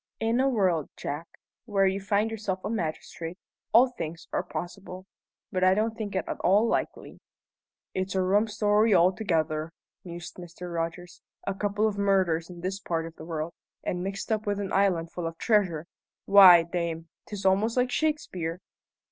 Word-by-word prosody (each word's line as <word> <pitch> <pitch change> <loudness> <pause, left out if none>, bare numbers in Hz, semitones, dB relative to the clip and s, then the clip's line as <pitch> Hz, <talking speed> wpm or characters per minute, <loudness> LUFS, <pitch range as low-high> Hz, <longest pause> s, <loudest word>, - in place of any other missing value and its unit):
"In 225 +2 +1
a 270 +1 +3
world, 185 - +1
Jack, 150 +4 -5 0.4
where 200 -4 +2
you 190 +1 0
find 205 +2 +1
yourself 195 -4 -3
a 210 - -2
magistrate, 165 -3 -4 0.3
all 245 +4 +6
things 165 -7 -6
are - - +1
possible. 180 +4 -7 0.5
But 185 -2 0
I 185 0 +5
don't 220 +2 0
think 210 -3 -5
it 190 - 0
at - - -4
all 200 +5 +4
likely." - - -3 0.7
"It's 185 0 -2
a 190 - +2
rum 205 +4 +3
story 210 0 +3
altogether," 170 -4 +1 0.3
mused 175 -1 -8
Mr. 175 0 -8
Rogers. 170 +1 -4 0.2
"A 195 - -1
couple 205 +2 0
of 205 -1 -3
murders 185 -5 +2
in 175 -1 -10
this 190 +2 -3
part 165 -4 -2
of 165 0 -9
the 160 - -10
world, 160 0 -4 0.3
and 180 - -2
mixed 195 +3 -4
up 215 -1 -1
with 205 0 0
an 200 -1 -4
island 180 -4 +2
full 175 -2 -4
of 165 0 -7
treasure! 185 -8 +1 0.4
Why, 185 -4 +9
damme, 170 -1 -3 0.2
'tis 205 -2 -6
almost 205 +5 +2
like 250 0 +2
Shakespeare!" 185 - -1
190 Hz, 175 wpm, -27 LUFS, 170-205 Hz, 0.7 s, Why